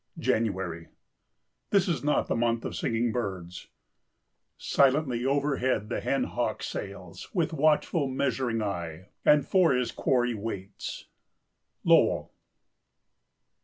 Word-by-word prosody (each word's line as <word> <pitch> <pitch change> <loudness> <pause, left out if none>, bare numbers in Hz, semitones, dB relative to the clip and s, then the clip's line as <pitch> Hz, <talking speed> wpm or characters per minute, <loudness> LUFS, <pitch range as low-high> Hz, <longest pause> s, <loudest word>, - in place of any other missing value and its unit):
January. 95 -7 -1 0.8
This 200 -2 +3
is 170 -5 -1
not 150 0 +2
the - - -1
month 115 0 0
of - - -4
singing 115 +1 0
birds. 95 -7 -4 0.9
"Silently 135 -3 +2
overhead 135 -6 0
the - - -1
hen - - 0
hawk - - -2
sails 95 -3 -7
With 170 -2 +1
watchful, 155 0 +2
measuring 130 -3 -1
eye, 90 -2 -5
and 150 -2 +5
for 180 -5 +4
his 125 -1 0
quarry 125 -2 +1
waits." 100 -2 -6 0.8
—Lowell. - - +3
120 Hz, 110 wpm, -28 LUFS, 100-140 Hz, 0.9 s, and